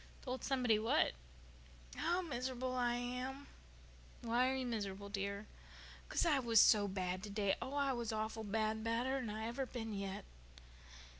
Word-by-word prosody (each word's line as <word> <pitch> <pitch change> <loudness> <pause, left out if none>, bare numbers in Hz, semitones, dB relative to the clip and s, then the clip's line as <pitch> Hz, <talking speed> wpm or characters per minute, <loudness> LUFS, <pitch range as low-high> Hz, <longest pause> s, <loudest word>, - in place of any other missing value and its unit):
"Told 255 0 -4
somebody 250 -5 +3
what?" 220 - +3 0.8
"How 355 +2 +1
mis'rubul 255 -3 -2
I 240 -1 +2
am." 250 +3 -3 0.8
"Why 240 +2 +3
are 265 - 0
you 260 -1 -1
miserable, 200 -4 -3
dear?" 200 +1 -3 0.6
"'Cause - - +2
I 300 -5 +4
was 230 -3 +5
so 205 -1 +7
bad 185 -1 -2
today, 200 -1 0
Anne. - - 0
Oh, 270 - -4
I 280 -2 +2
was 235 -2 -2
awful 220 0 -2
bad—badder'n 225 +4 0
I've 220 +2 -3
ever 260 +2 -2
been 225 -3 -4
yet." 195 - -4
230 Hz, 150 wpm, -38 LUFS, 210-255 Hz, 0.8 s, so